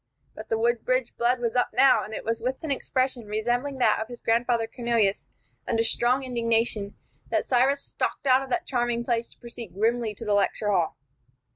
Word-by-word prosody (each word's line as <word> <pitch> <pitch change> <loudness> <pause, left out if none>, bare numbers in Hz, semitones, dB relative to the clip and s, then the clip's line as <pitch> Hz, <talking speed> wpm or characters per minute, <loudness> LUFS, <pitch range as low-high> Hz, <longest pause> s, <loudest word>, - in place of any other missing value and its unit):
But 215 - -10
the 225 - +1
Woodbridge 240 +2 0
blood 245 +1 +1
was 235 -1 -2
up 245 - +2
now, 275 - +5
and 215 - -8
it - - -6
was 230 +1 -1
with 255 +5 -3
an 315 - -3
expression 260 -3 -1
resembling 240 +6 -1
that 250 - +3
of 220 - -4
his 240 0 -9
grandfather 235 0 +1
Cornelius 230 -4 0 0.4
under 225 -1 +1
strong 245 +3 +2
indignation 230 -4 0 0.3
that - - 0
Cyrus 270 +3 +2
stalked - - -3
out 260 0 +5
of 270 - -7
that - - -1
charming 240 -2 -1
place 235 -1 -1
to - - -20
proceed 235 -6 -9
grimly 225 +1 0
to 230 - -8
the 210 - +1
lecture 205 +1 +1
hall. 175 -5 0
235 Hz, 190 wpm, -26 LUFS, 225-250 Hz, 0.4 s, now